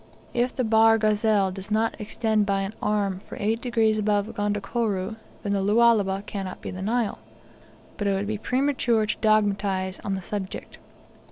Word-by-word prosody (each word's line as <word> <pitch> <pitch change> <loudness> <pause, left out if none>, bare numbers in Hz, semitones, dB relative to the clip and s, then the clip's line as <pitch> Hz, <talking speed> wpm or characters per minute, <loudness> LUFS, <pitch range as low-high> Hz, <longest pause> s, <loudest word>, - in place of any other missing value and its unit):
If 245 +1 0
the 255 - 0
Bahr 225 0 +5
Ghazal 215 -2 +2
does 190 +1 -8
not 220 +1 +1
extend 215 -1 0
by 195 -1 +1
an 195 +2 -4
arm 200 -3 0
for - - -7
eight 220 +3 0
degrees 225 -3 +2
above 210 0 0
Gondokoro, 205 0 -1 0.3
then 200 - -1
the 200 - +1
Lualaba 205 -2 +3
cannot 195 -3 -5
be - - -6
the 185 - -6
Nile. 225 +2 -1 0.8
But 205 - -1
it 200 - +2
would 195 +1 -1
be 215 0 -3
premature 250 -3 +1
to 215 - -2
dogmatise 200 -3 +1
on 195 - -1
the 190 - -5
subject. 195 0 -6
210 Hz, 170 wpm, -25 LUFS, 195-225 Hz, 0.8 s, Bahr